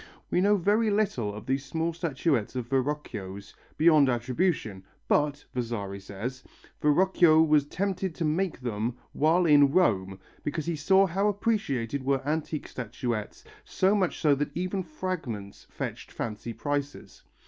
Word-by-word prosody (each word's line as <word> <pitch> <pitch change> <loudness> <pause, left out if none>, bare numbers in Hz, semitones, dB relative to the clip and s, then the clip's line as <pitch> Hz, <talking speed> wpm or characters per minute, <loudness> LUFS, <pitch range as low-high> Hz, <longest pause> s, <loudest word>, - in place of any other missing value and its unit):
We 180 - +3
know 205 +2 +4
very 210 +4 +2
little 200 - 0
of 105 +1 -9
these 135 +1 -1
small 165 +4 -2
statuettes 150 - -1
of 125 -2 -3
Verrocchio's, 120 -8 -3 0.2
beyond 155 -3 +5
attribution, 120 - -1 0.2
but, 145 -1 +1
Vasari 115 -5 -3
says, 110 +7 -6 0.4
Verrocchio 160 +1 +4
was 150 -2 +3
tempted 190 0 -2
to 170 - -2
make 165 -1 -1
them 120 0 -2 0.2
while 165 +4 +3
in 145 -3 +6
Rome, 95 - +2 0.3
because 150 +1 -3
he 170 -1 -1
saw 190 +6 +4
how 195 +3 0
appreciated 185 - -1
were 135 0 0
antique 155 0 -2
statuettes, 120 -2 -4 0.2
so 190 +2 +1
much 190 -4 +1
so 150 -2 +4
that 145 +2 -1
even 185 +2 -1
fragments 155 - -5
fetched - - -6
fancy 110 +1 -5
prices. 145 +3 -4
145 Hz, 140 wpm, -28 LUFS, 120-175 Hz, 0.4 s, in